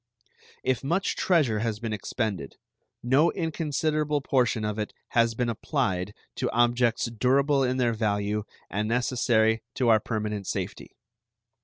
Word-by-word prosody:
If 130 Hz, 0 st, 0 dB
much 175 Hz, +8 st, 0 dB
treasure 145 Hz, -, +2 dB
has 110 Hz, -1 st, -2 dB
been 115 Hz, -1 st, -3 dB
expended, 100 Hz, -, -3 dB, 0.5 s
no 135 Hz, +7 st, +4 dB
inconsiderable 155 Hz, -3 st, 0 dB
portion 125 Hz, -5 st, +1 dB
of 105 Hz, 0 st, -2 dB
it 105 Hz, -, -4 dB
has 115 Hz, -1 st, +2 dB
been 125 Hz, +1 st, 0 dB
applied 105 Hz, -, -1 dB, 0.2 s
to -, -, 0 dB
objects 120 Hz, 0 st, +2 dB
durable 135 Hz, +5 st, +2 dB
in 130 Hz, 0 st, 0 dB
their 120 Hz, -2 st, +2 dB
value 105 Hz, -1 st, -1 dB, 0.2 s
and 105 Hz, +2 st, -2 dB
necessary 115 Hz, -2 st, +2 dB
to 125 Hz, -3 st, +2 dB
our 110 Hz, -1 st, +6 dB
permanent 105 Hz, -2 st, -3 dB
safety. -, -, -4 dB
120 Hz, 135 wpm, -27 LUFS, 110-135 Hz, 0.5 s, our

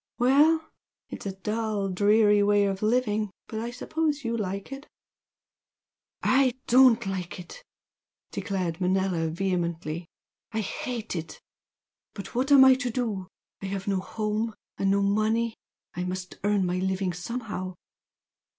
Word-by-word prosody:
Well! 300 Hz, +6 st, +4 dB, 0.4 s
It's -, -, -6 dB
a -, -, -1 dB
dull, 210 Hz, +1 st, -2 dB
dreary 205 Hz, +2 st, +4 dB
way 205 Hz, 0 st, +4 dB
of 195 Hz, -1 st, -2 dB
living, 215 Hz, -2 st, +1 dB, 0.2 s
but 220 Hz, -, -4 dB
I 230 Hz, +1 st, -3 dB
suppose 300 Hz, +4 st, -2 dB
you 230 Hz, -1 st, -1 dB
like 200 Hz, 0 st, -4 dB
it!" 275 Hz, +2 st, -8 dB, 1.4 s
"I 260 Hz, -2 st, +3 dB
DON'T 245 Hz, -2 st, +6 dB
like 190 Hz, -2 st, -4 dB
it!" 335 Hz, -, -11 dB, 0.7 s
declared 185 Hz, -4 st, -3 dB
Manella, 185 Hz, -2 st, +1 dB
vehemently, 170 Hz, -2 st, -2 dB, 0.5 s
"I 220 Hz, -, 0 dB
hate 225 Hz, +1 st, -4 dB
it! 165 Hz, -1 st, -6 dB, 0.8 s
But 200 Hz, -, -8 dB
what 260 Hz, +4 st, 0 dB
am 270 Hz, -2 st, +9 dB
I 265 Hz, -, +8 dB
to 255 Hz, -1 st, -1 dB
do? 220 Hz, -6 st, -2 dB, 0.3 s
I 195 Hz, -, -4 dB
have 195 Hz, 0 st, -4 dB
no 195 Hz, -2 st, +1 dB
home 215 Hz, +3 st, -2 dB, 0.2 s
and 195 Hz, -, 0 dB
no 200 Hz, 0 st, +3 dB
money. 220 Hz, +3 st, +1 dB, 0.4 s
I 180 Hz, -, -3 dB
must 185 Hz, 0 st, -5 dB
earn 205 Hz, -2 st, +2 dB
my 180 Hz, 0 st, -1 dB
living 190 Hz, -1 st, -1 dB
somehow." 185 Hz, -1 st, -5 dB
205 Hz, 140 wpm, -27 LUFS, 190-235 Hz, 1.4 s, am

